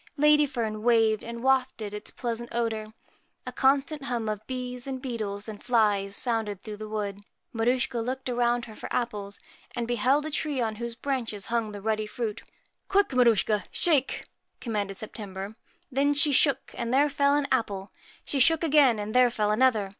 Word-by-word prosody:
Ladyfern 280 -8 +3
waved 225 -2 +3
and 235 +1 -7
wafted 255 -5 +1
its 210 - -5
pleasant 235 -1 -4
75 - - -3
PRETTY 220 -1 -3
odour. 215 - -16 0.5
A - - -4
constant 280 +2 +2
hum 240 -3 -2
of 215 0 -4
bees 250 0 -5
and 265 -1 -3
beetles 215 -6 -4
and 215 -2 -8
flies 215 -5 +3 0.2
MAR 240 - +2
sounded 210 -4 -3
through 210 -1 -7
the 215 0 -7
wood. 205 -2 -3 0.3
Maruschka 245 +1 +1
looked 260 +2 -4
USCHKA 250 - -1
a - - -4
bout 240 0 +1
her 220 - -11
for - - -8
apples, 205 -4 -2 0.4
and 235 -1 -2
beheld 255 +5 +2
a 310 - -4
tree 295 -2 -1
on 220 -3 -1
whose 235 0 -4
branches 230 -7 -3
hung 225 -2 0
the 205 -1 -8
ruddy 215 -1 0
fruit. 220 -1 -4 0.3
' - - -45
Quick, 400 0 +3
Maruschka, 225 -4 +3
shake! 295 -6 +1 0.2
' - - -51
commanded 205 -4 -3
Sep 215 - -8
tember. 195 -1 -6 0.4
Then 280 +2 +2
she 290 +1 +4
shook, 275 -1 +2
and 235 - -3
there 280 +3 +4
fell 280 0 +2
an 290 -1 +1
apple; 200 -6 -1 0.3
she 280 - 0
shook 325 +5 +4
again, 285 -7 +5
and 210 +1 -4
there 250 -1 +6
fell 210 -3 0
another. 220 -3 +3
235 Hz, 195 wpm, -27 LUFS, 215-265 Hz, 0.5 s, there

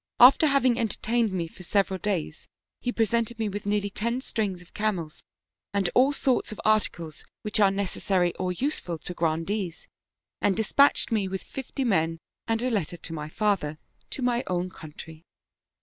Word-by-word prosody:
After 265 +5 +8
having 260 -4 +3
entertained 230 0 0
me 175 -3 -2
for 165 - -14
several 190 +1 +1
days 180 -5 -3 0.3
he 245 - -1
presented 230 0 0
me 220 -2 -1
with 205 0 -5
nearly 205 -1 0
ten 235 +5 -1
strings 210 -8 -2
of 180 - -17
camels 190 -8 -2 0.5
and 195 -3 +1
all 265 +3 +5
sorts 265 -4 0
of 215 - -7
articles 175 -7 0 0.2
which 210 0 -1
are 200 -2 +6
necessary 190 -2 0
or 185 -1 -1
useful 180 - -2
to 180 - -6
Grandees, 170 +3 -2 0.5
and 200 -1 +2
dispatched 260 +6 +4
me 210 -4 +1
with 190 0 -4
fifty 270 +1 -4
men 165 -8 +1 0.3
and 225 +1 0
a 255 - +1
letter 175 -6 -1
to 165 - -6
my 150 -1 -5
father, 185 -6 0 0.3
to 265 - -3
my 245 0 +1
own 180 0 -1
country. 160 -1 -11
200 Hz, 165 wpm, -27 LUFS, 175-230 Hz, 0.5 s, After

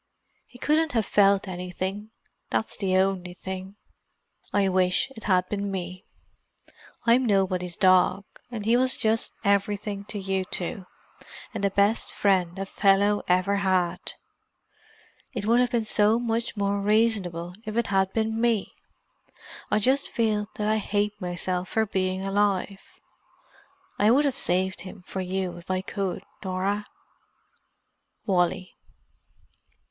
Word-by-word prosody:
"He 245 - -15
couldn't 310 +3 +1
have 225 -3 +1
felt 200 -1 +3
anything; 185 +3 -4 0.4
that's 220 - 0
the 185 -2 +1
only 185 -2 0
thing. 190 +1 -7 0.8
"I 200 -1 +2
wish 185 +5 +2
it 225 - -10
had 185 -3 +2
been 200 -1 -3
me. 185 -1 -5 1.0
I'm 240 +2 +5
nobody's 185 -5 0
dog, 185 +1 +4 0.2
and 225 -4 -6
he 230 +2 +4
was 255 +1 +3
just 220 +1 0
everything 200 0 0
to 210 - -6
you 190 -1 -1
two—and 185 +2 -7
the 200 - +3
best 200 +3 +1
friend 185 -3 +1
a 195 - -3
fellow 200 +1 +3
ever 185 +3 +2
had. 185 -3 +1 1.4
It 210 -3 -3
would 235 +3 +4
have 250 0 +3
been 235 -3 0
so 215 +1 +3
much 230 -1 -2
more 200 0 0
reasonable 200 -5 +1
if 215 0 -5
it 235 - +2
had 190 0 +2
been 220 +1 -1
me. 230 -4 +1 1.0
I - - +2
just 260 +6 +2
feel 215 -3 0
that 210 - -2
I 215 0 +2
hate 205 0 0
myself 180 +1 -2
for 220 0 +1
being 190 -1 -1
alive. 195 -1 0 1.2
I 210 - +5
would 275 +6 +4
have 275 - 0
saved 185 +2 0
him 185 0 -10
for 190 - -4
you 185 -1 -3
if 175 - -14
I 185 0 0
could, 195 -1 -3 0.2
Norah, 195 +2 -1 1.4
"Wally." 185 -1 0
200 Hz, 135 wpm, -26 LUFS, 185-215 Hz, 1.4 s, I'm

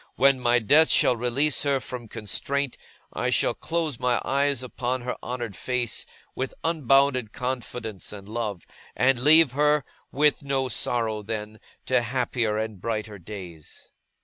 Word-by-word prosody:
when 135 0 +4
my 120 -1 +3
death 145 +8 +5
shall 125 - +4
release 125 +5 +1
her 140 -2 +1
from 125 -2 -7
constraint, 125 +6 -2 0.4
I - - -1
shall - - +2
close 160 -6 -3
my 125 -1 +1
eyes 140 -1 +1
upon 125 0 -3
her 125 +1 -3
honoured 120 -5 -5
face, 125 -4 -2 0.3
with 130 0 -4
unbounded 135 -6 +2
confidence 125 -5 -5
and 100 -1 -10
love; 105 -5 -4 0.3
and 125 0 +3
leave 155 +1 +7
her, 150 +1 +2 0.3
with 150 +1 +2
no 135 -2 -1
sorrow 115 -4 -1
then, 110 0 -5 0.3
to 130 -1 +2
happier 120 -2 -1
and 110 -4 -4
brighter 110 -2 -3
days. 90 -4 -10
125 Hz, 145 wpm, -25 LUFS, 110-135 Hz, 0.4 s, leave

